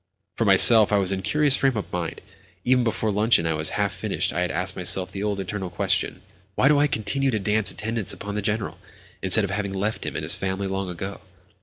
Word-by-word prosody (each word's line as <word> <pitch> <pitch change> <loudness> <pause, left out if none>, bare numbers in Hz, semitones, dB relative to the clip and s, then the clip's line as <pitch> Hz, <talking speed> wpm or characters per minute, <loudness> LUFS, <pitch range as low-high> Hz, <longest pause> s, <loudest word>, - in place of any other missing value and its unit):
For - - -1
myself, 110 -3 +7
I 105 - +3
was 95 -1 +1
in 95 - -2
a - - -7
curious 145 +6 +2
frame 135 -4 0
of 105 - -6
mind. 85 -2 -4 0.4
Even 125 0 +3
before 110 -1 -1
luncheon 105 -3 +2
was 75 0 0
half - - -1
finished - - -2
I 85 - -2
had 90 - -1
asked 90 +3 -3
myself 90 +1 -1
the 95 - -6
old, 105 -1 -2
eternal 95 0 -5
question: 85 - -1 0.3
"Why - - +3
do 145 0 +4
I 145 - +3
continue 135 +3 -1
to 115 - -1
dance 105 0 0
attendance 115 -2 -4
upon 100 0 -7
the 105 - -3
General, 105 +1 -3 0.4
instead 95 +3 +5
of 100 - -3
having 100 0 -3
left 105 +3 -3
him - - -5
and - - -4
his - - -2
family 95 +1 -3
long 95 -1 -3
ago?" 95 +3 -7
100 Hz, 225 wpm, -23 LUFS, 95-110 Hz, 0.4 s, myself